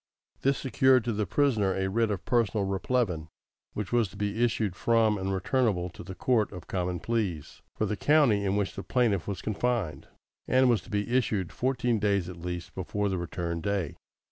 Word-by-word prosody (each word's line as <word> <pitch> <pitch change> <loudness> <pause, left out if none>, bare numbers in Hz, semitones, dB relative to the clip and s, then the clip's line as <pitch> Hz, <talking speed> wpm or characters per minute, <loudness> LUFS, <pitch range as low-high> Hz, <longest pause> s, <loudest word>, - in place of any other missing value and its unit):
This 135 0 +2
secured 130 -1 +3
to 120 - -1
the 105 -1 -1
prisoner 110 -5 +2
a 95 0 0
writ 115 +3 +1
of 100 -3 -3
personal 110 -4 +1
replevin, 95 -4 -1 0.5
which 105 -2 -4
was 120 -3 +3
to 95 - -14
be 105 +3 -1
issued 110 -5 0
from 115 +1 +3
and 95 +1 -2
returnable 95 -2 0
to - - -10
the 95 +1 -8
Court 110 +2 +1
of 90 -3 -9
Common 90 -1 -2
Pleas 100 -9 -3
for 110 - 0
the 105 - -1
county 135 -6 +3
in 100 0 +1
which 100 -2 0
the - - -4
plaintiff 110 -6 +1
was 100 -2 -4
confined, 110 -5 -1 0.4
and 130 -1 +4
was 115 - +2
to - - -16
be 105 +4 -1
issued 105 -9 0
fourteen 125 - 0
days 100 -4 +1
at 90 - -8
least 90 -1 -5
before 100 +2 -2
the 95 -2 -1
return 85 -1 -3
day. 100 -5 -1
105 Hz, 195 wpm, -28 LUFS, 95-120 Hz, 0.5 s, and